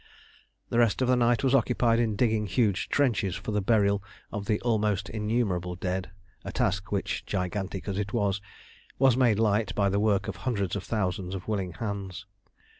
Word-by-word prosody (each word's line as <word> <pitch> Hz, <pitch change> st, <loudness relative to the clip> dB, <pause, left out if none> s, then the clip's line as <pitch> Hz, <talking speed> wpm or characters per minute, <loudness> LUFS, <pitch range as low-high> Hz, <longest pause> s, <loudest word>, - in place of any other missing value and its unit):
The 120 Hz, -, +1 dB
rest 120 Hz, +2 st, +3 dB
of -, -, +1 dB
the 125 Hz, -, +4 dB
night 120 Hz, 0 st, +2 dB
was 135 Hz, -1 st, +2 dB
occupied 120 Hz, -2 st, +3 dB
in 110 Hz, -3 st, +1 dB
digging 110 Hz, -2 st, +1 dB
huge 100 Hz, 0 st, +1 dB
trenches 115 Hz, -, +1 dB
for -, -, -5 dB
the 105 Hz, 0 st, +1 dB
burial 100 Hz, -1 st, +3 dB, 0.3 s
of 105 Hz, -2 st, -4 dB
the 105 Hz, -2 st, +1 dB
almost 105 Hz, -5 st, 0 dB
innumerable 105 Hz, -5 st, -1 dB
dead, 95 Hz, +1 st, -3 dB, 0.3 s
a -, -, -5 dB
task -, -, -1 dB
which, -, -, -1 dB
gigantic 95 Hz, 0 st, -3 dB
as 100 Hz, 0 st, -2 dB
it 100 Hz, -1 st, -3 dB
was, 100 Hz, -4 st, 0 dB, 0.6 s
was 135 Hz, -2 st, +5 dB
made 120 Hz, -5 st, +3 dB
light 110 Hz, 0 st, +1 dB
by 100 Hz, -1 st, +2 dB
the 100 Hz, +1 st, +1 dB
work 105 Hz, 0 st, +2 dB
of -, -, -4 dB
hundreds 100 Hz, -8 st, -1 dB
of 100 Hz, -, -3 dB
thousands 95 Hz, -3 st, -2 dB
of 95 Hz, -, -7 dB
willing 95 Hz, -5 st, -2 dB
hands. 100 Hz, -2 st, -5 dB
105 Hz, 185 wpm, -28 LUFS, 95-115 Hz, 0.6 s, was